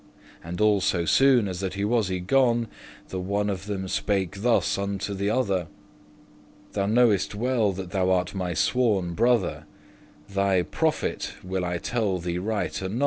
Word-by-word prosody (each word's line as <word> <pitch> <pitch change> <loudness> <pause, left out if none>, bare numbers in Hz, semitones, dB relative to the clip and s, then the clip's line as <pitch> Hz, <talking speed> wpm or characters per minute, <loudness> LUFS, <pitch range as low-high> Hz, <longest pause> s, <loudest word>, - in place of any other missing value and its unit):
And 85 +1 -6
all 105 -2 +4
so 85 -2 +1
soon 125 - +4
as 90 -2 -4
that 95 -1 -3
he 100 +1 -1
was 110 -3 +1
y 95 - -1
gone, 120 +4 +2 0.4
The 95 - -4
one 100 +2 -1
of 95 +1 -6
them 95 -2 -3
spake 100 0 -1
thus 120 +1 +2
unto 100 0 -3
the 100 +1 -1
other; 100 -8 0 1.0
"Thou 100 -1 -1
knowest 110 -3 +3
well 115 -2 +1
that 95 -1 -7
thou 95 -1 +1
art 90 -1 +1
my 90 -3 -3
sworn 100 - +1
brother, 115 -2 +1 0.6
*Thy 100 -2 +1
profit* 160 - -1
will 95 0 -2
I 90 0 -1
tell 105 -1 -1
thee 85 0 -3
right 100 -1 -2
anon. 95 +5 -3
100 Hz, 165 wpm, -25 LUFS, 95-110 Hz, 1.0 s, all